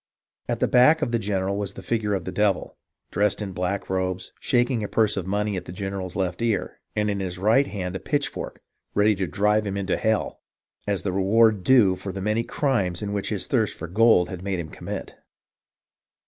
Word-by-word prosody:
"At - - -1
the - - +3
back 150 +6 +5
of 120 - -1
the 115 - +1
general 100 -1 -1
was 100 -1 -4
a - - -8
figure 105 -3 0
of 90 -3 -4
the 95 - -4
Devil, 105 -2 0 0.4
dressed 105 -1 +1
in 105 -3 -4
black 90 +2 -2
robes, 95 0 -2
shaking 120 -2 +1
a - - -2
purse 110 -1 +2
of 95 -2 -3
money 105 +1 0
at 90 - -4
the - - -8
general's 95 -1 -5
left 95 +1 -2
ear, 110 -6 -1 0.2
and 105 -1 +1
in 100 -1 -1
his 90 -2 -4
right 110 +9 +3
hand 95 -2 -4
a - - -2
pitchfork, 145 -1 -3 0.3
ready 105 +1 +4
to 95 -2 -2
drive 105 +5 +1
him 100 0 -2
into 95 -1 -1
hell, 110 -1 0 0.5
as 100 -3 -1
the 95 - -1
reward 105 +1 +3
due 105 -4 +5
for 95 +1 -6
the 95 - -6
many 105 +4 +1
crimes 105 - -1
which 100 -1 -2
his - - -2
thirst - - 0
for 85 - -6
gold 100 -1 +4
had 90 -2 -6
made 95 -1 -1
him 80 -2 -5
commit. - - -6
100 Hz, 205 wpm, -24 LUFS, 95-110 Hz, 0.5 s, back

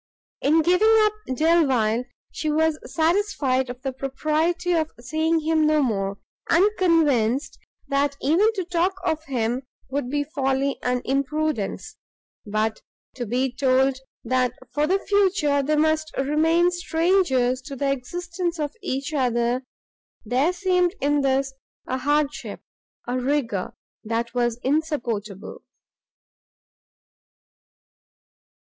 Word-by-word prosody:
In 315 +3 +3
giving 360 +6 +4
up 425 -1 +3 0.2
Delvile 260 -8 +2 0.3
she 310 - -3
was 315 0 +1
satisfied 315 -7 +1
of 245 +1 -8
the 270 -1 -2
propriety 310 +7 -1
of 320 -2 +1
seeing 315 +6 0
him 315 0 +2
no 305 -1 +3
more, 200 -5 -1 0.3
and 345 +4 +5
convinced 290 -8 +2 0.3
that 280 0 0
even 355 +10 +3
to 380 -4 -3
talk 355 +2 0
of 315 -2 0
him 245 -2 -1 0.3
would 275 -2 -2
be 290 +1 0
folly 275 -2 -1
and 250 0 -1
imprudence; 275 -3 -2 0.5
but 215 +1 -1 0.3
to 245 -3 -5
be 255 +4 0
told 260 0 +2 0.2
that 250 0 +1 0.2
for 295 +2 +1
the 380 +4 +3
future 385 -8 +2
they 300 +3 0
must 315 +1 +1
remain 320 +5 +3
strangers 325 -8 +1
to 275 +1 -8
the 275 +1 0
existence 345 +6 -3
of 295 -1 -2
each 280 -4 -3
other 245 -2 +1 0.6
there 255 +9 +2
seemed 365 0 +1
in 290 +1 +2
this 270 0 +1 0.3
a 260 - -2
hardship, 290 +2 -1 0.4
a 250 +1 -1
rigour, 250 -8 -1 0.3
that 230 +1 -2
was 240 -2 0
insupportable. 240 - -2
285 Hz, 120 wpm, -24 LUFS, 255-325 Hz, 0.6 s, and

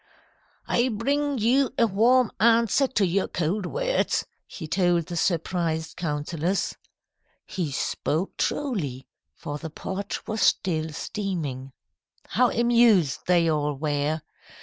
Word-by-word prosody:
"'I 240 +2 +2
bring 280 +5 0
you 250 +4 +2
a 235 - +5
warm 230 +4 +3
answer 230 +3 +4
to 210 -6 +1
your 185 +2 0
cold 180 +4 -2
words,' - - 0 0.2
he 160 - -8
told 175 0 +2
the 175 - -6
surprised 165 -2 -1
councillors. 165 +3 -2 0.7
He 170 -6 -3
spoke 155 +5 -2
truly, 155 - -2 0.3
for 145 0 -6
the 160 - -6
pot 190 +5 -5
was 220 0 -2
still 160 -4 +2
steaming. 150 -7 -4 0.6
How 250 -1 +3
amused 235 - +3
they 175 -2 +4
all 150 -2 0
were! 150 +2 -1
180 Hz, 120 wpm, -25 LUFS, 155-230 Hz, 0.7 s, a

